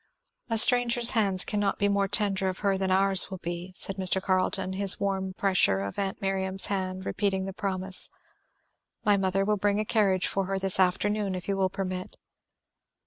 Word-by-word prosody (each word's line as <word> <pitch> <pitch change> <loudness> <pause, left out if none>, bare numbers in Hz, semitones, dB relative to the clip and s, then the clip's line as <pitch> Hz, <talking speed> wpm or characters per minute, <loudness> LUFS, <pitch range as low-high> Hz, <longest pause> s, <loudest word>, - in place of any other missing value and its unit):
"A 225 - -1
stranger's 240 +1 +6
hands 195 -5 +1
cannot 205 -2 -2
be 205 - 0
more 200 -1 0
tender 195 -2 -1
of 185 - -6
her 195 -1 +2
than 190 0 -2
ours 190 0 +4
will 190 - -7
be," 175 +1 -7
said 195 +1 -2
Mr. 190 0 +1
Carleton, 185 0 -2
his 195 0 +3
warm 190 -1 -3
pressure 185 - +1
of 100 - -6
aunt 195 0 -4
Miriam's 190 0 +3
hand 185 -1 -4
repeating 190 -1 -2
the 195 - -7
promise. 190 -2 -2 1.0
"My 205 -1 +4
mother 195 0 -1
will 210 0 0
bring 205 +1 0
a 215 - -2
carriage 195 -4 +1
for 195 -1 -2
her 195 0 -2
this 190 +1 0
afternoon, 195 +2 0
if 180 - -8
you 200 - -1
will 190 -1 0
permit." 185 -1 -6
195 Hz, 185 wpm, -26 LUFS, 185-200 Hz, 1.0 s, stranger's